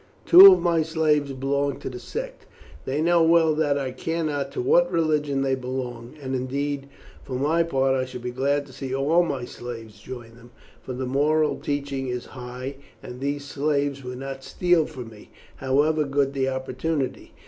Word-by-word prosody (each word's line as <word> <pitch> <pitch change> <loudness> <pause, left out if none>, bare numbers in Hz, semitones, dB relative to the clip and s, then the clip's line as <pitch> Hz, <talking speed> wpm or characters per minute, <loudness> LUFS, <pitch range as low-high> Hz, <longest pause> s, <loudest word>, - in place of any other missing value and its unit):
Two 380 +3 +11
of 370 - +4
my 170 -2 +2
slaves 155 -3 +1
belong 140 +1 -1
to - - -7
the 125 -1 -6
sect. 120 - -7 0.4
They 140 +4 -1
know 170 0 +4
well 165 -1 +4
that 150 -2 +1
I 135 -2 -2
care 165 +6 -3
not 145 -3 -2
to - - -4
what 175 +8 +3
religion 150 -5 +1
they 135 -1 +1
belong, 125 -1 -5
and 135 -2 -5
indeed, 140 +2 -2 0.4
for 130 - -8
my 150 +6 +2
part, 135 -5 +1
I 130 -1 0
should 125 -1 -9
be 125 - -3
glad 140 +3 0
to 135 - -15
see 135 0 -4
all 150 +6 +3
my 140 -7 -2
slaves 115 -4 -9
join 120 0 -9
them, 120 0 -16 0.3
for 130 - -6
the 130 +1 -3
moral 150 +4 +1
teaching 140 -2 -3
is 125 -1 -4
high, 130 +2 -7 0.3
and 125 0 -8
these 140 +1 -3
slaves 140 -1 -1
would 125 0 -6
not 135 0 -7
steal 175 -1 +2
from 125 -6 -8
me, 105 -2 -15 0.3
however 145 +4 +2
good 140 -1 0
the 135 -1 0
opportunity. 130 +2 -3
140 Hz, 185 wpm, -24 LUFS, 130-150 Hz, 0.4 s, Two